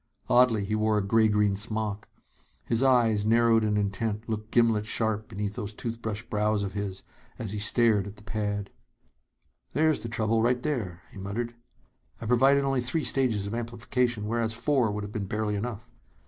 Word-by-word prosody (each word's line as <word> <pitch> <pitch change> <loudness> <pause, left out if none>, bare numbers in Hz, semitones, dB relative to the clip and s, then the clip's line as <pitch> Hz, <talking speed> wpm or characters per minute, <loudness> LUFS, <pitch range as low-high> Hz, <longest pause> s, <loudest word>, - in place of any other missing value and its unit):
Oddly, 120 -5 +4
he 105 - -3
wore 110 0 +2
a 105 - +1
gray 110 +2 +4
green 105 -1 +2
smock. 105 0 -3 0.6
His 115 0 +2
eyes, 120 -6 +4
narrowed 115 0 +4
and 105 -1 +1
intent, 105 +2 -2
looked 110 -1 -4
gimlet 115 -3 +2
sharp 110 -1 0
beneath 105 -2 -4
those 105 0 -6
toothbrush 115 -2 -4
brows 105 0 0
of 95 -1 -4
his, 100 -2 -4 0.3
as 110 -4 -5
he 105 - -3
stared 105 -2 +3
at 100 - -9
the 105 - -16
pad. 105 -1 -3 1.0
"There's 155 -5 +2
the 115 - -5
trouble, 115 0 +1
right 125 +1 +1
there," 105 - -3
he - - -11
muttered. 115 +5 -4 0.7
"I - - -7
provided 135 +4 +4
only 135 -2 +1
three 150 +6 -1
stages 120 -7 +1
of 100 - -5
amplification, 120 -1 -1
whereas 115 0 0
four 125 -1 +1
would 105 0 -3
have 100 - -6
been 100 -2 -3
barely 105 +1 -1
enough. 110 +2 -4
110 Hz, 175 wpm, -27 LUFS, 105-120 Hz, 1.0 s, Oddly